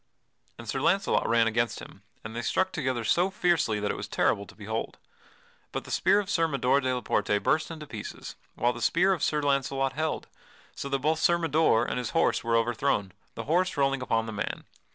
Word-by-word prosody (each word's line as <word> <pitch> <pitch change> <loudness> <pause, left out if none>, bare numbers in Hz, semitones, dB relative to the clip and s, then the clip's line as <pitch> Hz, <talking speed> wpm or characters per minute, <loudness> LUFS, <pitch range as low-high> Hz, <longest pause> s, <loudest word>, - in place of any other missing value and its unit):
And 120 - -10
Sir 135 +4 -2
Launcelot 195 +6 +2
ran 115 0 +4
against 115 +1 0
him, - - -12 0.2
and 110 +1 -8
they 120 - -2
struck 190 +10 0
together 130 -8 -2
so 175 +11 +2
fiercely 175 - +1
that 105 0 -1
it - - -5
was - - -5
terrible 100 0 0
to - - -15
behold. 110 +2 -4 0.7
But - - -4
the - - -10
spear 205 - +3
of 205 - -3
Sir 165 -4 +2
Mador 140 -2 +2
de 130 -1 0
la 125 -1 -1
Porte 105 - +1
burst 160 - +1
into 160 -2 -7
pieces, 110 -7 -8 0.2
whilst 120 0 +1
the - - -8
spear 185 +3 +3
of 170 - -4
Sir 150 -1 +1
Launcelot 135 -1 0
held, 155 +1 -2 0.5
so 140 - -6
that 135 - +1
both 155 +4 0
Sir 170 +1 +4
Mador 160 -8 +2
and - - -2
his 125 - -3
horse - - +2
were 115 0 +1
overthown, 115 -3 +1 0.2
the 115 - -5
horse 175 +5 +1
rolling 135 -1 +1
upon 115 -2 0
the 110 - -6
man. 105 - -4
135 Hz, 215 wpm, -28 LUFS, 115-160 Hz, 0.7 s, ran